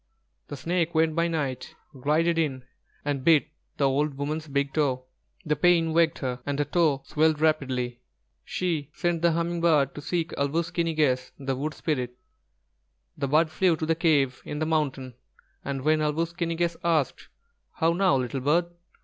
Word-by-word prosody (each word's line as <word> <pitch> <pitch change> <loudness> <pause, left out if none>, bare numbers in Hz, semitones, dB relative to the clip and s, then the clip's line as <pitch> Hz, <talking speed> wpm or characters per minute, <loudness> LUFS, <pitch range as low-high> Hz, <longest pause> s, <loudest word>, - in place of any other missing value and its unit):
The 145 - -7
snake 170 +3 -1
went 160 0 +3
by 170 0 +2
night, 145 -6 -3 0.2
glided 155 +5 +1
in 135 -6 -1 0.4
and 140 -3 -1
bit 155 -1 +4 0.3
the 140 - +3
old 140 +2 0
woman's 155 +3 -3
big 140 -1 -1
toe. 130 -4 0 0.4
The 150 -1 +1
pain 165 -1 +3
waked 165 0 +3
her, 125 -2 -4
and 140 +1 -2
her 145 - +1
toe 145 -3 +1
swelled 155 0 +2
rapidly. 130 -6 0 0.4
She 160 -6 -2
sent 175 -1 -1
the 170 -1 +3
Humming 170 +1 -1
bird 150 -5 +3
to 145 - -8
seek 170 +2 -2
Āl 140 0 +1
wūs 170 +3 -1
ki 170 - +1
ni 165 -1 -2
gess, 130 -4 +1
the 135 -1 -2
Wood 150 +4 -3
Spirit. 125 -6 -2 1.0
The 140 - -2
bird 155 +3 +3
flew 180 +1 +3
to 155 - -2
the 165 - +2
cave 150 -6 +2
in 150 - -5
the 155 - -1
mountain, 140 -5 -1 0.5
and 135 -1 -4
when 155 +1 +3
Āl 150 -1 +1
wūs 165 +1 -2
ki 170 -1 -1
ni 165 - -2
gess 170 0 0
asked: 160 -6 0 0.5
"How 165 +1 +2
now, 185 -4 +3
little 130 0 -2
bird?" 170 +6 +2
155 Hz, 185 wpm, -26 LUFS, 140-165 Hz, 1.0 s, bit